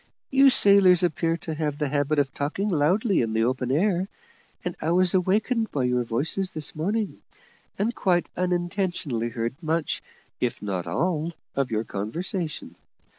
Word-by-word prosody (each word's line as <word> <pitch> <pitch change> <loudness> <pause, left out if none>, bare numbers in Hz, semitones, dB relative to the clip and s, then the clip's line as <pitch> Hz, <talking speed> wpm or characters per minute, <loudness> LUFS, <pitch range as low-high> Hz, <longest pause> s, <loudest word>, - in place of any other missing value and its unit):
You 275 0 +7
sailors 195 -6 +6
appear 165 -1 +1
to 160 - -6
have 150 -2 -2
the 150 -2 -1
habit 145 +1 0
of 135 -2 +1
talking 165 +9 -2
loudly 185 - +2
in 115 -2 -1
the 110 0 +2
open 125 +1 0
air, 185 +4 +1 0.6
and 180 - -2
I 160 - -1
was 180 +1 +3
awakened 215 +5 +1
by 140 - -1
your 125 0 +1
voices 150 +11 -1
this 155 -1 -2
morning, 205 +7 -2 0.6
and 220 +4 0
quite 180 -6 +1
unintentionally 175 - -1
heard 115 +5 -4
much, 160 -1 -1 0.4
if 125 -2 -1
not 95 -4 -3
all, 165 - -1 0.2
of 135 -1 0
your 110 -1 -1
conversation. 155 - -4
165 Hz, 155 wpm, -25 LUFS, 135-185 Hz, 0.6 s, You